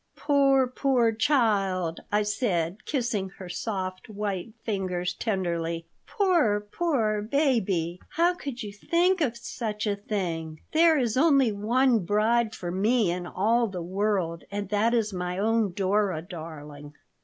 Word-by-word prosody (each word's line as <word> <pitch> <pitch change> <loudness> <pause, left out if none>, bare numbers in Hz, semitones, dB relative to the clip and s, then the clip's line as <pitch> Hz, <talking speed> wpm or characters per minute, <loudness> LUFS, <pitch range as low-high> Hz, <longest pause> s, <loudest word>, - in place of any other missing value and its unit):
"Poor, 275 -2 +3
poor 250 -2 +2
child!" 200 - +1
I 210 +1 +2
said, 205 -3 -1
kissing 235 -8 -1
her 185 - -8
soft 185 0 -4
white 205 0 -4
fingers 185 -4 -2
tenderly. 170 -5 -2 0.2
"Poor, 340 - +2
poor 215 -3 0
baby! 205 - 0
How 345 +2 +3
could 280 -9 -6
you 205 -1 -7
think 345 - +1
of 240 -6 0
such 220 -2 -4
a 205 -1 0
thing! 170 -6 -4
There 320 0 +5
is 245 -3 0
only 275 -5 +4
one 235 +4 +2
bride 220 +4 +1
for 175 -1 -5
me 210 +1 +2
in 175 0 -4
all 230 +6 +1
the 185 -4 -5
world, 185 -2 -1
and 205 -1 -4
that 215 +3 +2
is 215 -3 0
my 180 0 -3
own 220 0 +1
Dora 195 -2 0
darling." 150 -4 -9
210 Hz, 140 wpm, -27 LUFS, 185-240 Hz, 0.2 s, There